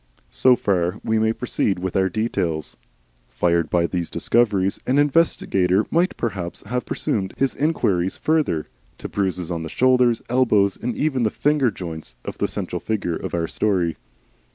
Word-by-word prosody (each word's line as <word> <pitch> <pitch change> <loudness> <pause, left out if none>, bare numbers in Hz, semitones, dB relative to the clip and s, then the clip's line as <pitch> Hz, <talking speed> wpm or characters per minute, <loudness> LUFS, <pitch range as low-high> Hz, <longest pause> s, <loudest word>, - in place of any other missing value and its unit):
So 130 -1 +4
far 95 -5 0
we 110 0 +1
may 110 0 +2
proceed 110 -4 -1
with 90 0 -4
our 95 0 +2
details. 85 -7 -2 0.5
Fired 85 +6 +1
by 85 -1 +2
these 85 -1 -2
discoveries, 100 -5 +1
an 130 - +2
investigator 110 - +2
might 175 +3 +1
perhaps 95 -6 -4
have 125 +4 -3
pursued 95 -3 -2
his 135 -1 +1
inquiries 95 - 0
further 155 - +1 0.3
to - - -6
bruises 90 -3 -2
on 85 -1 -2
the 80 - -5
shoulders, 125 0 +3
elbows, 110 -6 +3
and 120 0 -4
even 145 -4 0
the 110 - +2
finger 145 +1 +2
joints, 80 - -7
of - - -6
the - - +1
central - - -4
figure 100 -6 -2
of - - -4
our 85 -1 -1
story. 90 -1 0
100 Hz, 160 wpm, -22 LUFS, 90-125 Hz, 0.5 s, So